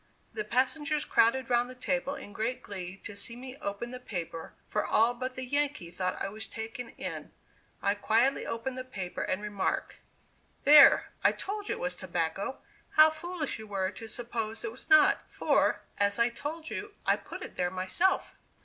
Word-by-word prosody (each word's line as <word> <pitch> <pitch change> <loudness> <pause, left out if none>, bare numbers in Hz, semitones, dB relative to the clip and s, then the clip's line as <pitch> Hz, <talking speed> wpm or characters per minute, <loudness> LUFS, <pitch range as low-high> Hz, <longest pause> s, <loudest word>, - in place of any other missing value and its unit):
The 425 - -2
passengers 295 - +1
crowded 235 +2 +3
round 240 +1 +3
the 255 - -8
table 270 +2 -1
in 205 -7 -9
great 245 +5 -2
glee 185 -2 -6
to 205 - -6
see 200 +4 -2
me 255 +1 -8
open 205 +3 -4
the 250 - -6
paper, 170 -8 -6
for 210 - 0
all 230 +2 +3
but 255 +1 -4
the 260 - -4
Yankee 285 - -1
thought 185 +1 -2
I - - -1
was 215 +2 -5
taken 225 +2 -6
in. - - -5 0.5
I 200 - +3
quietly 225 +6 +2
opened 255 +3 -3
the - - -3
paper, 195 -8 -5
and 185 +3 -1
remarked: 205 -2 -2 0.7
"There, 290 -1 +8
I - - +6
told 415 +1 -4
you - - 0
it - - -9
was 180 0 -2
tobacco 180 +6 -3 0.3
how 310 0 +8
foolish 315 -4 -4
you 220 - -9
were 195 -2 -1
to 225 +3 -9
suppose 225 -1 -4
it 230 - -3
was 245 - -11
not 390 -1 +6
for, - - +2 0.2
as 200 0 +2
I 235 +1 +4
told 310 +7 -6
you, 410 0 -5
I - - +4
put - - -8
it - - -9
there 180 0 0
myself." 185 - +1
235 Hz, 185 wpm, -30 LUFS, 200-275 Hz, 0.7 s, There